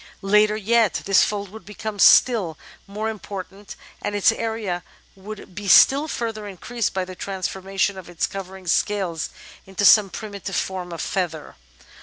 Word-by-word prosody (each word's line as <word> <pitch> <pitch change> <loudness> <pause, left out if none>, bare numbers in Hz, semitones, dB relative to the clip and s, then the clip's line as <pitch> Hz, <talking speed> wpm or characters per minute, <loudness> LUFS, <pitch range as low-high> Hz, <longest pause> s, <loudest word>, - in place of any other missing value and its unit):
Later 210 +2 +3
yet 220 -1 +2
this 195 -1 +5
fold 205 -2 -3
would 220 +1 -12
become 210 +2 -7
still 195 -12 +5 0.3
more 210 +2 -4
important, 200 -2 -7 0.3
and 205 - -3
its 205 +1 +4
area 220 -6 -3 0.3
would 195 0 -10
be 205 +2 -7
still 275 - +6
further 225 -6 -4
increased 220 +4 -3
by 190 -1 -1
the 185 - -9
transformation 190 +1 -3
of 175 - -12
its 175 - -1
covering 190 -1 -8
scales 175 -2 0 0.4
into 195 +1 -1
some 205 -1 +7
primitive 200 -2 -6
form 185 -2 -3
of 170 - -5
feather. 170 -5 -3
200 Hz, 150 wpm, -22 LUFS, 185-215 Hz, 0.4 s, some